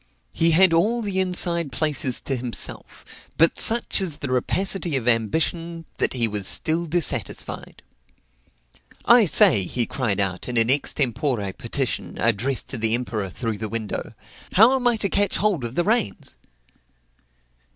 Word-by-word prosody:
He 165 Hz, -, +2 dB
had 170 Hz, +2 st, +4 dB
all 225 Hz, +8 st, +1 dB
the 195 Hz, -2 st, -2 dB
inside 175 Hz, -4 st, +1 dB
places 145 Hz, -5 st, 0 dB
to 135 Hz, -, -3 dB
himself; 120 Hz, -1 st, -5 dB, 0.3 s
but 165 Hz, +1 st, +3 dB
such 230 Hz, -2 st, +3 dB
is 170 Hz, -6 st, -3 dB
the 140 Hz, -, -5 dB
rapacity 175 Hz, +5 st, 0 dB
of 125 Hz, -3 st, -3 dB
ambition, 165 Hz, -, -1 dB
that -, -, 0 dB
he 120 Hz, -3 st, +2 dB
was 105 Hz, -3 st, -1 dB
still 165 Hz, +2 st, +1 dB
dissatisfied. 170 Hz, 0 st, -2 dB, 1.2 s
"I 235 Hz, -2 st, +6 dB
say," 105 Hz, -, +5 dB
he 120 Hz, +6 st, -1 dB
cried 110 Hz, -7 st, -2 dB
out 95 Hz, -2 st, -2 dB
in 125 Hz, -1 st, -2 dB
an 115 Hz, +2 st, +4 dB
extempore 130 Hz, -6 st, -1 dB
petition, -, -, -4 dB
addressed 115 Hz, +4 st, 0 dB
to 130 Hz, -, -4 dB
the 110 Hz, +1 st, +1 dB
emperor 110 Hz, -5 st, -4 dB
through 110 Hz, +2 st, -5 dB
the 110 Hz, 0 st, -5 dB
window, 115 Hz, -1 st, -5 dB, 0.4 s
"how 225 Hz, +7 st, +5 dB
am 255 Hz, -2 st, 0 dB
I 240 Hz, -2 st, +2 dB
to 205 Hz, -, 0 dB
catch 200 Hz, +1 st, 0 dB
hold 200 Hz, -, 0 dB
of 120 Hz, +1 st, -6 dB
the 175 Hz, -, +1 dB
reins?" 210 Hz, -, -1 dB
145 Hz, 150 wpm, -22 LUFS, 115-180 Hz, 1.2 s, I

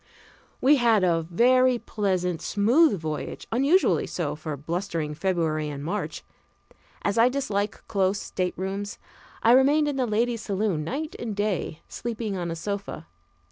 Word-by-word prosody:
We 285 Hz, +3 st, +6 dB
had 230 Hz, -5 st, +3 dB
a 170 Hz, -2 st, +3 dB
very 255 Hz, +6 st, +4 dB
pleasant, 185 Hz, -7 st, -1 dB
smooth 225 Hz, -, +3 dB
voyage, 155 Hz, -1 st, -5 dB
unusually 280 Hz, +11 st, +3 dB
so 160 Hz, -5 st, -3 dB
for 155 Hz, -1 st, -5 dB
blustering 165 Hz, 0 st, -3 dB
February 155 Hz, -3 st, -1 dB
and 140 Hz, -1 st, -6 dB
March. 205 Hz, +6 st, -3 dB, 0.8 s
As 200 Hz, +2 st, +1 dB
I 235 Hz, +2 st, +6 dB
dislike 215 Hz, -6 st, -2 dB
close 195 Hz, -1 st, +1 dB
staterooms, 190 Hz, +2 st, -3 dB, 0.5 s
I 230 Hz, -, +6 dB
remained 285 Hz, +4 st, +5 dB
in 285 Hz, -2 st, -2 dB
the 255 Hz, -2 st, +1 dB
ladies' 230 Hz, +1 st, 0 dB
saloon 195 Hz, -6 st, -1 dB
night 295 Hz, -, -4 dB
and 225 Hz, -3 st, -4 dB
day, 200 Hz, -6 st, -2 dB
sleeping 225 Hz, -3 st, -4 dB
on 175 Hz, -2 st, -3 dB
a 165 Hz, -, -3 dB
sofa. 200 Hz, -2 st, -5 dB
200 Hz, 140 wpm, -26 LUFS, 170-240 Hz, 0.8 s, We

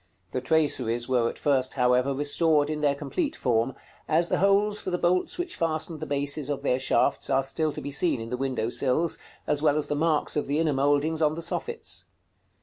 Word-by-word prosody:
The 130 Hz, -, -2 dB
traceries 125 Hz, -6 st, +1 dB
were 120 Hz, -3 st, +2 dB
at -, -, -8 dB
first, 130 Hz, -3 st, +1 dB
however, 125 Hz, +1 st, +2 dB
restored 145 Hz, +2 st, +2 dB
in 150 Hz, -1 st, -3 dB
their 145 Hz, -2 st, +2 dB
complete 315 Hz, -, -3 dB
form, 120 Hz, 0 st, 0 dB, 0.3 s
as 165 Hz, +2 st, +2 dB
the -, -, +1 dB
holes 200 Hz, +2 st, +3 dB
for -, -, -4 dB
the 180 Hz, -, 0 dB
bolts 180 Hz, +1 st, +1 dB
which 355 Hz, 0 st, -3 dB
fastened 160 Hz, -1 st, -1 dB
the 155 Hz, -, -5 dB
bases 145 Hz, 0 st, -1 dB
of 145 Hz, -, -3 dB
their 125 Hz, -, +1 dB
shafts 130 Hz, -, +1 dB
are 135 Hz, 0 st, +2 dB
still 155 Hz, +3 st, -1 dB
to -, -, -7 dB
be 145 Hz, -, -5 dB
seen 150 Hz, -2 st, +1 dB
in 115 Hz, 0 st, -6 dB
the -, -, 0 dB
window 130 Hz, -3 st, -2 dB
sills, 140 Hz, +7 st, +1 dB, 0.3 s
as 150 Hz, -1 st, 0 dB
well 150 Hz, -1 st, +3 dB
as 150 Hz, -, -2 dB
the 150 Hz, -, 0 dB
marks 155 Hz, 0 st, +1 dB
of 150 Hz, -, -1 dB
the 145 Hz, +2 st, 0 dB
inner 160 Hz, -2 st, +1 dB
mouldings 145 Hz, +4 st, +1 dB
on 155 Hz, -1 st, +3 dB
the 165 Hz, +1 st, -6 dB
soffits. 465 Hz, -, -4 dB
145 Hz, 215 wpm, -26 LUFS, 135-160 Hz, 0.3 s, holes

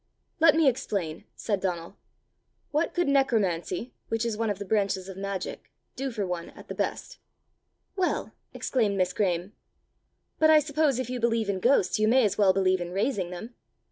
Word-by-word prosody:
"Let 320 Hz, -1 st, +6 dB
me 320 Hz, -2 st, +4 dB
explain!" 195 Hz, -10 st, -1 dB
said 205 Hz, -3 st, -1 dB
Donal: 175 Hz, -1 st, -3 dB, 0.8 s
"what 305 Hz, +3 st, 0 dB
could 350 Hz, -3 st, +1 dB
necromancy, 225 Hz, -6 st, +1 dB
which 225 Hz, +1 st, -1 dB
is 230 Hz, -2 st, -1 dB
one 225 Hz, 0 st, -1 dB
of 205 Hz, -, -1 dB
the 200 Hz, -, -6 dB
branches 195 Hz, -2 st, 0 dB
of 190 Hz, -, -7 dB
magic, 195 Hz, 0 st, -5 dB, 0.3 s
do 270 Hz, +1 st, -2 dB
for 215 Hz, -5 st, -3 dB
one 175 Hz, -2 st, -4 dB
at -, -, -15 dB
the -, -, -3 dB
best?" -, -, -3 dB, 0.8 s
"Well!" 375 Hz, -2 st, -1 dB, 0.2 s
exclaimed 215 Hz, -6 st, 0 dB
Miss 185 Hz, -1 st, +1 dB
Graeme; 180 Hz, -1 st, -1 dB, 0.4 s
" -, -, -48 dB
but 315 Hz, -, +5 dB
I 315 Hz, -, +8 dB
suppose 295 Hz, -2 st, +2 dB
if 255 Hz, -1 st, -3 dB
you 250 Hz, -, -3 dB
believe 230 Hz, -2 st, +1 dB
in 195 Hz, -2 st, 0 dB
ghosts, 235 Hz, -2 st, +3 dB
you 215 Hz, -, +3 dB
may 250 Hz, +1 st, +5 dB
as 205 Hz, -, +1 dB
well 200 Hz, -2 st, +5 dB
believe 185 Hz, -1 st, +2 dB
in 175 Hz, -, -4 dB
raising 200 Hz, -3 st, 0 dB
them!" 200 Hz, +7 st, -8 dB
210 Hz, 185 wpm, -27 LUFS, 185-255 Hz, 0.8 s, I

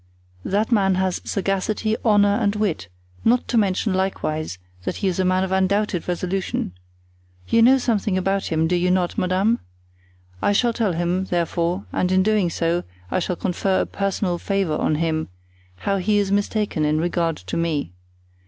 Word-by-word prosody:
"That 210 Hz, +4 st, 0 dB
man 195 Hz, -4 st, +3 dB
has 185 Hz, -1 st, 0 dB
sagacity, 200 Hz, +2 st, -1 dB
honor 205 Hz, -3 st, +4 dB
and 210 Hz, -3 st, +1 dB
wit, 205 Hz, -, -1 dB, 0.4 s
not 240 Hz, +2 st, +3 dB
to -, -, -1 dB
mention 200 Hz, -1 st, +2 dB
likewise 155 Hz, -, -2 dB, 0.3 s
that -, -, -3 dB
he 200 Hz, -, -1 dB
is 185 Hz, -1 st, -1 dB
a -, -, +3 dB
man 185 Hz, +1 st, +2 dB
of 190 Hz, -, -3 dB
undoubted 190 Hz, -1 st, +1 dB
resolution. 180 Hz, -, -2 dB, 0.8 s
You 230 Hz, -, +3 dB
know 255 Hz, +4 st, +7 dB
something 215 Hz, -6 st, 0 dB
about 195 Hz, +1 st, 0 dB
him, 160 Hz, 0 st, +2 dB
do 180 Hz, -, +1 dB
you 180 Hz, +1 st, +1 dB
not, 180 Hz, -1 st, +1 dB
madame? 190 Hz, +6 st, +1 dB, 0.8 s
I 205 Hz, -, +2 dB
shall 235 Hz, +3 st, +2 dB
tell 220 Hz, -5 st, 0 dB
him, 175 Hz, +3 st, 0 dB
therefore, 175 Hz, +1 st, -1 dB
and 185 Hz, -, 0 dB
in 185 Hz, 0 st, +4 dB
doing 210 Hz, -3 st, +2 dB
so 170 Hz, +1 st, 0 dB, 0.3 s
I -, -, +1 dB
shall 180 Hz, 0 st, -2 dB
confer 185 Hz, +2 st, 0 dB
a -, -, 0 dB
personal 195 Hz, -3 st, -2 dB
favor 195 Hz, -6 st, 0 dB
on 155 Hz, -, +1 dB
him, 160 Hz, 0 st, -1 dB, 0.5 s
how 195 Hz, -, -1 dB
he 205 Hz, +3 st, +1 dB
is 200 Hz, -1 st, +1 dB
mistaken 205 Hz, -4 st, 0 dB
in 150 Hz, +1 st, +2 dB
regard 170 Hz, -1 st, 0 dB
to 90 Hz, -1 st, -6 dB
me. 160 Hz, -, -1 dB
190 Hz, 170 wpm, -22 LUFS, 175-205 Hz, 0.8 s, know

